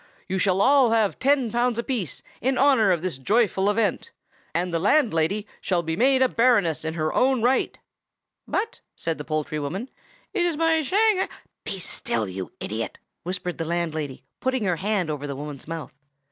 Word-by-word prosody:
You 190 Hz, +1 st, -1 dB
shall 190 Hz, 0 st, +2 dB
all 270 Hz, -2 st, +5 dB
have 225 Hz, -3 st, +2 dB
ten 270 Hz, -4 st, +2 dB
pounds 240 Hz, 0 st, +1 dB
apiece, 235 Hz, -, -3 dB, 0.2 s
in 260 Hz, +3 st, +1 dB
honor 265 Hz, -7 st, +5 dB
of 175 Hz, -2 st, 0 dB
this 180 Hz, -8 st, -3 dB
joyful 200 Hz, -, +2 dB
event, 220 Hz, -, 0 dB, 0.4 s
and 175 Hz, +1 st, -1 dB
the 165 Hz, -, +1 dB
landlady 205 Hz, -, +2 dB, 0.2 s
shall 175 Hz, -3 st, 0 dB
be 160 Hz, 0 st, -2 dB
made 260 Hz, +5 st, +4 dB
a -, -, +5 dB
baroness 230 Hz, -12 st, +2 dB
in 160 Hz, 0 st, -3 dB
her 155 Hz, -1 st, -1 dB
own 260 Hz, -2 st, +3 dB
right!" 255 Hz, +2 st, +2 dB, 0.7 s
"But," 440 Hz, +3 st, -2 dB
said 165 Hz, -2 st, -3 dB
the -, -, -4 dB
poultry 155 Hz, 0 st, -2 dB
woman, 185 Hz, -, -4 dB, 0.4 s
"it 375 Hz, -, +1 dB
is 345 Hz, -3 st, 0 dB
my 325 Hz, 0 st, +3 dB
Shang—" 395 Hz, +5 st, +2 dB, 0.4 s
"Be 195 Hz, -, -3 dB
still, 115 Hz, -, -2 dB
you 95 Hz, -2 st, -6 dB
idiot!" -, -, -4 dB, 0.2 s
whispered 180 Hz, -1 st, -4 dB
the 165 Hz, -, -1 dB
landlady, 160 Hz, -5 st, -2 dB, 0.2 s
putting 260 Hz, -3 st, 0 dB
her 180 Hz, -4 st, +1 dB
hand 195 Hz, -4 st, 0 dB
over 145 Hz, -1 st, -4 dB
the 140 Hz, -, -4 dB
woman's 145 Hz, -1 st, -7 dB
mouth. 165 Hz, -2 st, -6 dB
195 Hz, 175 wpm, -25 LUFS, 160-255 Hz, 0.7 s, all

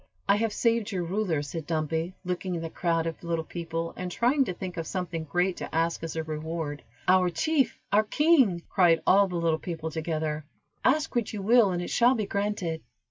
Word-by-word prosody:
"I 200 Hz, +1 st, +5 dB
have 225 Hz, 0 st, 0 dB
saved 230 Hz, 0 st, +1 dB
your 185 Hz, -3 st, -1 dB
ruler," 175 Hz, -4 st, -1 dB
said 150 Hz, +1 st, -6 dB
Dumpy, 160 Hz, +2 st, -1 dB
looking 180 Hz, 0 st, -2 dB
at 165 Hz, -, -4 dB
the 165 Hz, -, -5 dB
crowd 165 Hz, -2 st, 0 dB
of 165 Hz, +1 st, -5 dB
little 165 Hz, -1 st, -1 dB
people, 165 Hz, -1 st, -4 dB
and 180 Hz, 0 st, -5 dB
trying 255 Hz, +8 st, +3 dB
to 185 Hz, -, -3 dB
think 180 Hz, -1 st, -6 dB
of 165 Hz, -1 st, -3 dB
something 170 Hz, -4 st, -3 dB
great 175 Hz, +4 st, 0 dB
to -, -, -6 dB
ask 165 Hz, +1 st, +1 dB
as 165 Hz, 0 st, -5 dB
a 160 Hz, -, -1 dB
reward. 155 Hz, -1 st, -4 dB, 0.3 s
"Our 185 Hz, 0 st, +5 dB
chief! 270 Hz, -, +1 dB, 0.2 s
our 210 Hz, -, +6 dB
king!" 260 Hz, -, +3 dB
cried 170 Hz, -4 st, +3 dB
all 200 Hz, +1 st, +5 dB
the 180 Hz, -, -5 dB
little 165 Hz, -2 st, +1 dB
people, 160 Hz, -2 st, -5 dB
together. 155 Hz, -1 st, -2 dB, 0.4 s
"Ask 300 Hz, +3 st, +2 dB
what 235 Hz, -3 st, 0 dB
you 205 Hz, -2 st, -4 dB
will 230 Hz, 0 st, +5 dB
and 175 Hz, -1 st, -1 dB
it -, -, -5 dB
shall 245 Hz, +2 st, +4 dB
be 215 Hz, -3 st, -1 dB
granted." 200 Hz, -5 st, -2 dB
175 Hz, 205 wpm, -27 LUFS, 165-200 Hz, 0.4 s, our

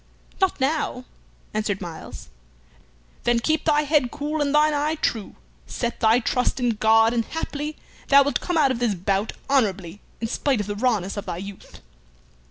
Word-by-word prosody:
"Not 380 Hz, -5 st, +2 dB
now," 270 Hz, -2 st, -1 dB, 0.5 s
answered 210 Hz, -2 st, -1 dB
Myles. 170 Hz, -, -9 dB, 0.9 s
"Then 240 Hz, -1 st, +3 dB
keep 315 Hz, +5 st, 0 dB
thy 300 Hz, -2 st, +4 dB
head 290 Hz, -4 st, +2 dB
cool 300 Hz, +3 st, -3 dB
and 285 Hz, -, +1 dB
thine 300 Hz, +1 st, +4 dB
eye 295 Hz, +2 st, 0 dB
true. 225 Hz, -9 st, -2 dB, 0.3 s
Set 235 Hz, -1 st, -3 dB
thy 225 Hz, +2 st, +4 dB
trust 250 Hz, +2 st, 0 dB
in 245 Hz, -1 st, +2 dB
God, 225 Hz, +1 st, +4 dB
and 235 Hz, -1 st, +1 dB
haply 300 Hz, +2 st, -4 dB, 0.3 s
thou 280 Hz, 0 st, +7 dB
wilt 285 Hz, -, -1 dB
come 355 Hz, -2 st, -1 dB
out 280 Hz, -4 st, +4 dB
of 245 Hz, -, -2 dB
this 235 Hz, -4 st, +1 dB
bout 195 Hz, +4 st, -1 dB
honorably 200 Hz, -9 st, 0 dB, 0.2 s
in 225 Hz, -, -2 dB
spite 260 Hz, +1 st, 0 dB
of 205 Hz, -, -2 dB
the 205 Hz, +1 st, -4 dB
rawness 210 Hz, -4 st, 0 dB
of 205 Hz, -, -5 dB
thy 175 Hz, -2 st, -3 dB
youth." 195 Hz, +1 st, -10 dB
240 Hz, 175 wpm, -23 LUFS, 210-290 Hz, 0.9 s, thou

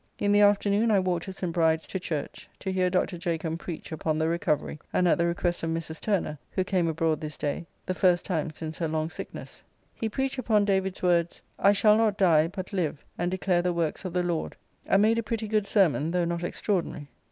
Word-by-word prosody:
In 205 Hz, -, +1 dB
the 205 Hz, 0 st, +5 dB
afternoon 205 Hz, +2 st, +4 dB
I 210 Hz, -, +4 dB
walked 180 Hz, -2 st, -1 dB
to 190 Hz, -, -5 dB
St. 180 Hz, -2 st, -4 dB
Bride's 160 Hz, -2 st, +2 dB
to 190 Hz, -, -4 dB
church, 155 Hz, -5 st, -5 dB
to 190 Hz, -, -4 dB
hear 185 Hz, -1 st, +1 dB
Dr. 180 Hz, -1 st, 0 dB
Jacomb 165 Hz, -2 st, -2 dB
preach 170 Hz, -2 st, -7 dB
upon 155 Hz, 0 st, -1 dB
the 160 Hz, 0 st, +1 dB
recovery, 155 Hz, -2 st, -1 dB
and 180 Hz, -, +2 dB
at 170 Hz, -, +3 dB
the 170 Hz, -, +3 dB
request 175 Hz, 0 st, -1 dB
of 165 Hz, -, -2 dB
Mrs. 165 Hz, -1 st, -4 dB
Turner, 175 Hz, -8 st, -1 dB
who 185 Hz, -, -1 dB
came 185 Hz, -2 st, +1 dB
abroad 160 Hz, -1 st, 0 dB
this 155 Hz, -1 st, -5 dB
day, 150 Hz, +3 st, -3 dB, 0.2 s
the 185 Hz, -, -1 dB
first 180 Hz, -1 st, +3 dB
time 165 Hz, -4 st, -1 dB
since 155 Hz, 0 st, -7 dB
her 165 Hz, -, 0 dB
long 155 Hz, +1 st, -2 dB
sickness. -, -, -8 dB, 0.3 s
He 225 Hz, -, -3 dB
preached 265 Hz, +4 st, -2 dB
upon 215 Hz, -5 st, +2 dB
David's 190 Hz, -2 st, 0 dB
words, 175 Hz, -1 st, +1 dB, 0.2 s
"I 200 Hz, -, +5 dB
shall 210 Hz, +1 st, +5 dB
not 220 Hz, -3 st, +2 dB
die, 165 Hz, -5 st, +4 dB
but 185 Hz, +2 st, -7 dB
live, 160 Hz, -6 st, -2 dB
and 175 Hz, +1 st, -1 dB
declare 185 Hz, -1 st, +1 dB
the 180 Hz, 0 st, 0 dB
works 170 Hz, 0 st, -1 dB
of 185 Hz, -3 st, -5 dB
the 180 Hz, 0 st, +1 dB
Lord," 170 Hz, -2 st, -2 dB, 0.3 s
and 195 Hz, +1 st, +4 dB
made 225 Hz, +2 st, +3 dB
a -, -, -2 dB
pretty 220 Hz, 0 st, -3 dB
good 210 Hz, -1 st, 0 dB
sermon, 165 Hz, -7 st, +3 dB
though 175 Hz, 0 st, +1 dB
not 170 Hz, 0 st, -2 dB
extraordinary. 175 Hz, -5 st, -2 dB
175 Hz, 220 wpm, -27 LUFS, 165-200 Hz, 0.3 s, the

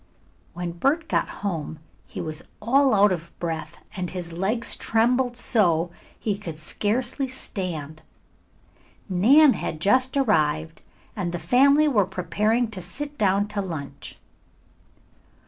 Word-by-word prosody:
When 175 Hz, 0 st, -4 dB
Bert 280 Hz, -, 0 dB
got -, -, 0 dB, 0.2 s
home 160 Hz, -4 st, -3 dB, 0.3 s
he -, -, -6 dB
was 155 Hz, 0 st, -5 dB, 0.2 s
all 260 Hz, +3 st, +3 dB
out 200 Hz, 0 st, +5 dB
of 170 Hz, -2 st, -4 dB
breath, 160 Hz, -1 st, -4 dB, 0.2 s
and 180 Hz, -2 st, -3 dB
his 175 Hz, -2 st, -6 dB
legs 200 Hz, +7 st, 0 dB
trembled 245 Hz, +2 st, +1 dB
so 175 Hz, -9 st, +2 dB, 0.3 s
he 205 Hz, -2 st, -2 dB
could 165 Hz, -7 st, -7 dB
scarcely 240 Hz, -, -1 dB
stand. 170 Hz, -, -5 dB, 1.1 s
Nan 255 Hz, +10 st, +6 dB
had 155 Hz, -, -4 dB
just 255 Hz, -, +2 dB
arrived 160 Hz, -, +1 dB, 0.3 s
and 185 Hz, -5 st, -2 dB
the 175 Hz, -, -3 dB
family 275 Hz, -, +4 dB
were 210 Hz, -10 st, +2 dB
preparing 210 Hz, +5 st, 0 dB
to 190 Hz, -4 st, -4 dB
sit 290 Hz, +11 st, -6 dB
down 200 Hz, 0 st, +2 dB
to 210 Hz, -1 st, -2 dB
lunch. 140 Hz, -7 st, -7 dB
200 Hz, 130 wpm, -24 LUFS, 170-245 Hz, 1.1 s, Nan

